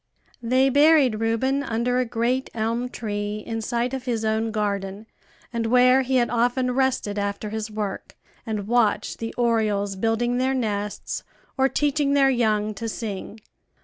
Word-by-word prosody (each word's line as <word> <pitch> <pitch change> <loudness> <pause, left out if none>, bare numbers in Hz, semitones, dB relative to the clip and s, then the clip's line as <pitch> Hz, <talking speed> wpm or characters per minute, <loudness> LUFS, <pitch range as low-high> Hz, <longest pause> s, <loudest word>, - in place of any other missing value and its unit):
They 255 +3 +3
buried 285 -5 +5
Reuben 230 +5 +1
under 245 -1 0
a 255 - +1
great 245 +3 -1
elm 230 +3 -1
tree 210 -2 -4
in 225 -1 -3
sight 235 +3 -1
of 260 -1 -4
his 230 -3 -1
own 220 +1 0
garden, 205 -1 -2 0.5
and 230 -1 -1
where 250 +2 +5
he 260 0 -1
had 240 -2 +3
often 245 +2 +1
rested 250 -5 0
after 200 +1 -3
his 220 0 -3
work, 210 -2 -5 0.3
and 215 -3 -3
watched 235 -3 +1
the 225 0 -4
orioles 215 -4 +1
building 225 +4 0
their 260 +1 +1
nests 210 -4 -3 0.3
or 265 0 +3
teaching 290 0 +1
their 270 -1 +5
young 215 -4 +1
to 225 +3 -5
sing. 215 0 -6
230 Hz, 155 wpm, -24 LUFS, 215-255 Hz, 0.5 s, buried